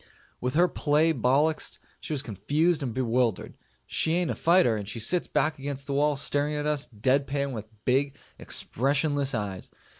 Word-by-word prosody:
With 125 +2 -2
her 175 +3 +5
play 155 0 +2
bollixed, 140 +5 +1 0.2
she - - -7
was 145 -3 -2
confused 145 - 0
and 130 -4 -2
bewildered. 120 -3 0 0.3
She 160 - 0
ain't 175 -1 0
a - - -3
fighter, 170 -9 +4
and 105 -2 -5
she 115 - -5
sits 170 +11 +2
back 150 0 0
against 140 0 -4
the 140 - -3
wall 145 +1 +2
staring 145 +2 -1
at 150 0 -2
us 150 -1 -1
dead 130 +5 +1
pan 140 0 -1
with 110 -4 -5 0.2
big 135 +2 +1 0.2
expressionless 140 +1 0
eyes. 100 -4 -4
140 Hz, 175 wpm, -27 LUFS, 125-150 Hz, 0.3 s, her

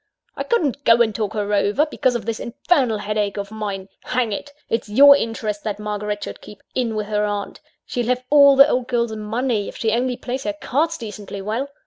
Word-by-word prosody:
I - - -5
couldn't 295 - 0
go 235 -1 +6
and 220 -2 -2
talk 210 -1 -2
her 210 -1 -2
over, 205 +8 +2
because 255 -5 0
of 235 - -3
this 225 -1 -3
infernal 250 -1 +1
headache 210 -1 -2
of 200 0 -5
mine 200 -3 -5 0.2
Hang 245 -3 0
it! 285 +8 -5 0.2
it's 225 -2 -2
your 280 +6 +8
interest 220 -4 -3
that 210 -2 -3
Margaret 210 0 -4
should - - -7
keep 210 - -13
in 235 -4 -1
with 215 -1 -2
her 210 0 0
aunt; 205 -1 -3 0.3
she'll 240 -2 -3
have 250 0 0
all 280 -1 +7
the 275 +1 +8
old 250 -4 0
girl's 235 -3 0
money, 220 0 -1
if - - -8
she 220 - 0
only 245 +2 0
plays 260 +1 -4
her 205 -1 -2
cards 320 +9 0
decently 210 -3 -7
well. 230 +7 -2
225 Hz, 210 wpm, -21 LUFS, 210-255 Hz, 0.3 s, your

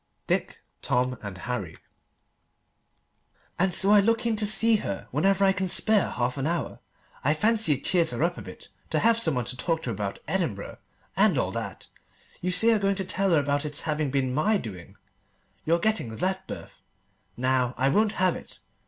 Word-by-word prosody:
DICK, - - -2 0.2
TOM, 125 +1 0
AND 100 -3 -7
HARRY 100 -7 -5 1.8
"AND 190 +1 +2
so 195 +3 +3
I 210 - +7
look 230 +3 +1
in 230 -1 +1
to 210 -1 0
see 220 +2 +4
her 100 - -5
whenever 195 +7 +2
I 195 - +5
can 190 0 -2
spare 210 +3 +2
half 125 +2 -2
an 135 - -1
hour. 170 +1 -3 0.4
I 150 +3 +2
fancy 215 -2 +2
it 140 - -6
cheers 175 -3 +2
her 125 +5 -1
up 175 +1 +1
a - - -8
bit - - -12 0.2
to - - 0
have 230 0 +3
some 160 - +1
one 125 -2 -1
to 125 - -3
talk 165 +5 -2
to 120 - -3
about 100 -2 -4
Edinburgh 160 - -3 0.4
and - - +3
all - - 0
that. - - -6 0.6
You 180 - -1
say 200 +6 +5
you're 225 -2 +4
going 200 0 +1
to 190 -1 -4
tell 195 +1 0
her 165 -4 +4
about 145 0 0
its 150 -1 -1
having 150 -2 -1
been 130 -1 0
my 205 +10 +2
doing, 95 - -9 0.7
your 165 +2 +3
getting 170 - -1
that 190 +6 -2
berth. - - -9 0.6
Now, 130 0 +1
I 135 +2 +2
won't 210 +8 +2
have 185 -1 +1
it. - - -11
165 Hz, 195 wpm, -26 LUFS, 130-195 Hz, 1.8 s, I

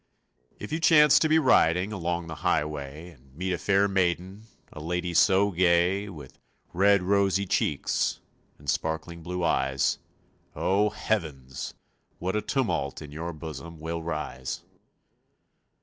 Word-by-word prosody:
If - - -8
you 160 - -1
chance 150 -3 +6
to 155 - +2
be 160 - +5
riding 95 - +3
Along 85 -2 -2
the 80 -1 -7
highway 75 +2 -2
And 65 -3 -22
meet 95 +3 -2
a 85 - -3
fair 100 0 +3
maiden, 95 +2 -1 0.3
A - - -9
lady 90 +2 -2
so 95 +3 +4
gay, 90 +3 +2
With 75 -8 -11 0.3
red, 100 +1 +4
rosy 100 0 +2
cheeks 75 -5 0 0.4
And 70 - -17
sparkling 80 +4 -2
blue 90 +2 -4
eyes, 65 -5 +1 0.6
Oh, 100 +3 +2
heavens! 70 -14 -3 0.4
what 95 +3 -2
a 105 - +1
tumult 90 - -1
In 75 -2 -10
your 85 +3 -5
bosom 80 +1 -8
will 85 +1 -4
rise! 75 -6 -4
85 Hz, 135 wpm, -27 LUFS, 80-100 Hz, 0.6 s, chance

